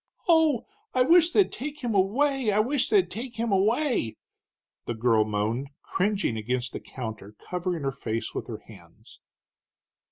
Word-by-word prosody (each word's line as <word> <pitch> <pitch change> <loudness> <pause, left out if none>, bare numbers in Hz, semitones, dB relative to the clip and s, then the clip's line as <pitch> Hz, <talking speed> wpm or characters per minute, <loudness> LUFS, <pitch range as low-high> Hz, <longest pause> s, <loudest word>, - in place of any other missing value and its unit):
"Oh, 320 -7 +4 0.3
I 255 - +5
wish 335 +4 +5
they'd 395 +1 +3
take 295 +3 -6
him 235 -2 -1
away! 245 +5 +2
I 205 - +1
wish 255 +5 +1
they'd 395 -3 +3
take 240 +2 -6
him 225 0 -1
away!" 210 - +1 0.7
the 120 - -2
girl 110 -1 +3
moaned, 110 +6 -2
cringing 195 - 0
against 125 +3 -2
the - - -4
counter, 110 -4 -8
covering 180 -3 -2
her 135 - 0
face 115 -4 -4
with - - -4
her - - -7
hands. - - -16
200 Hz, 155 wpm, -27 LUFS, -, 0.7 s, I